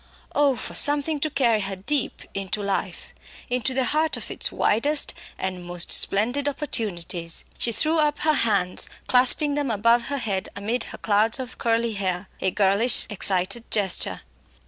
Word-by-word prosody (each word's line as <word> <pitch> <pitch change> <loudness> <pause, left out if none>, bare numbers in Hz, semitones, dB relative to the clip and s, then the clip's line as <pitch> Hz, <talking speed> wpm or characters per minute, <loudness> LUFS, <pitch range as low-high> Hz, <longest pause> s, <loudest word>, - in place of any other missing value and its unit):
Oh! 285 -2 +2
for 225 - -6
something 290 +1 +2
to 310 - -1
carry 235 -7 +1
her 195 0 -3
deep 255 +8 -1
into 195 +1 -4
life; 200 -1 -4 0.4
into 250 +1 0
the 260 0 0
heart 310 +4 +1
of - - -8
its - - -1
widest 285 +8 +1 0.2
and 185 -1 -4
most 175 0 -2
splendid 245 +8 +1
opportunities! 180 - -3
She 235 - +2
threw 315 +8 +3
up 295 -1 +1
her 310 0 +3
hands, 200 -9 0 0.2
clasping 260 +4 +4
them 290 -2 -1
above 230 +2 +2
her 285 - -2
head 200 -7 -1
amid 225 +4 -3
her - - -8
clouds 220 +4 +1
of 255 -1 -7
curly 230 0 0
hair 190 -2 -3
a 190 - +1
girlish 200 +5 +2
excited 200 +3 +2
gesture. 200 -4 +1
230 Hz, 160 wpm, -23 LUFS, 195-280 Hz, 0.4 s, clasping